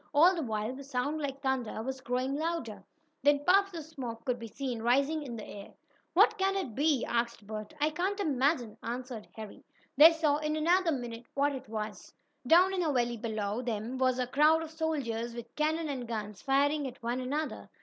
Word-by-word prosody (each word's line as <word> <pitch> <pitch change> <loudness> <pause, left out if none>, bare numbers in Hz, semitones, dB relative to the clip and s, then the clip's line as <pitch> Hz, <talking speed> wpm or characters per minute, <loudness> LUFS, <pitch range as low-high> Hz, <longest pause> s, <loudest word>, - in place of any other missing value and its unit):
All 340 +6 +7
the 340 - -2
while 220 -2 -2
the 275 +2 -8
sound 280 +3 -2
like 275 -1 -4
thunder 255 -5 -1
was 265 +1 -4
growing 255 +2 -1
louder. 285 - -3 0.4
Then 285 +1 +3
puffs 395 +1 +4
of 320 - -5
smoke 250 -7 -7
could 250 -2 -1
be 230 - -6
seen 245 0 -4
rising 275 +7 +2
in 255 -5 -6
the 215 - -7
air. 200 -1 -10 0.4
"What 430 +3 +5
can 385 +1 +2
it 330 - -2
be?" 290 0 +2
asked 235 -2 -1
Bert. 215 +3 -7
"I 300 +1 +2
can't 375 +6 -1
imagine," 270 - +1
answered 240 -1 -5
Harry. 215 -2 -9 0.3
They 315 +4 +10
saw, 315 -3 +2
in 305 0 -1
another 340 +3 +3
minute, 240 -3 -5
what 285 +1 +2
it 260 -5 -8
was. 215 -2 -5 0.4
Down 360 +6 +6
in 370 - 0
a 320 -3 +1
valley 240 -3 0
below 215 -1 -2
them 235 +1 -3
was 255 -1 +2
a 250 - 0
crowd 305 +5 +4
of 320 - -8
soldiers, 260 -8 -2
with 235 0 -9
cannon 315 +1 0
and 260 -4 -4
guns, 210 -3 -5
firing 285 +1 +2
at 250 -1 -10
one 240 +2 -1
another. 290 +5 -3
265 Hz, 200 wpm, -31 LUFS, 235-310 Hz, 0.4 s, They